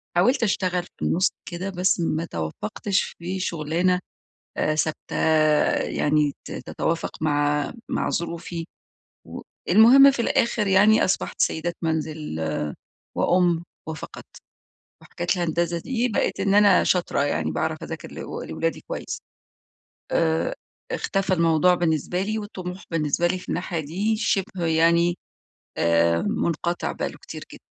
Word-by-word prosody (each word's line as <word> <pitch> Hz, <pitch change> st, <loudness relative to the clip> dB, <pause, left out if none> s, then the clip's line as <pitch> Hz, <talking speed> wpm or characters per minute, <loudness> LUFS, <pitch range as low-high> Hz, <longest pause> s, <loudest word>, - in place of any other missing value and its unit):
حاولت 245 Hz, +9 st, +3 dB
أشتغل 185 Hz, -4 st, 0 dB
في -, -, -16 dB, 0.2 s
النُص 180 Hz, +3 st, +3 dB, 0.2 s
كده، 180 Hz, +2 st, -5 dB
بس 185 Hz, 0 st, +1 dB
ما 165 Hz, -1 st, 0 dB
توفقتش 105 Hz, -, -2 dB, 0.2 s
في 180 Hz, +3 st, -4 dB
شغلانة 175 Hz, +1 st, 0 dB, 0.6 s
آآ، 155 Hz, -, +1 dB
ثابتة 155 Hz, 0 st, -2 dB, 0.7 s
يعني 150 Hz, -1 st, +1 dB
ت -, -, -8 dB
تتوافق 165 Hz, 0 st, -2 dB
مع 145 Hz, -1 st, +1 dB, 0.2 s
مع -, -, -1 dB
ظروفي. 170 Hz, 0 st, -3 dB, 1.0 s
والمهم، 265 Hz, +6 st, +8 dB
في 265 Hz, -, -2 dB
الآخر 230 Hz, -2 st, +1 dB
يعني 205 Hz, +3 st, +5 dB
أصبحت 185 Hz, -, -1 dB
سيدة 170 Hz, +2 st, 0 dB
منزل 160 Hz, -1 st, -2 dB, 1.0 s
وأم 175 Hz, -2 st, +2 dB, 0.2 s
وفقط. 155 Hz, -1 st, -7 dB, 0.8 s
وحكاية 175 Hz, -, -7 dB
الهندسة 170 Hz, -1 st, 0 dB
دي 245 Hz, +5 st, -1 dB
بقيت 220 Hz, -, -1 dB
إن 195 Hz, -, +1 dB
أنا 205 Hz, -2 st, +6 dB
شاطرة، 180 Hz, -5 st, +1 dB
يعني 80 Hz, -, -1 dB
باعرف -, -, -1 dB
أذاكر -, -, -7 dB
ل -, -, -11 dB
لأولادي 165 Hz, 0 st, -4 dB
كويس. -, -, -5 dB, 0.9 s
آآ، 160 Hz, -1 st, +1 dB, 0.4 s
اختفى 195 Hz, -1 st, -1 dB
الموضوع 165 Hz, +1 st, +4 dB
بالنسبة 175 Hz, +1 st, 0 dB
لي، 215 Hz, +2 st, -2 dB
والطموح 185 Hz, -3 st, -7 dB
بالنسبة 165 Hz, 0 st, +1 dB
لي 185 Hz, +1 st, 0 dB
في -, -, -13 dB
الناحية 175 Hz, -1 st, -2 dB
دي 190 Hz, +9 st, -1 dB
شبه 195 Hz, -5 st, -1 dB
يعني 170 Hz, +2 st, +3 dB, 0.6 s
آآ، 85 Hz, 0 st, +3 dB
منقطع 170 Hz, +1 st, -1 dB
بقى -, -, -3 dB
له -, -, -12 dB
كتير -, -, -8 dB
جدًا. -, -, -11 dB
175 Hz, 130 wpm, -24 LUFS, 160-190 Hz, 1.0 s, والمهم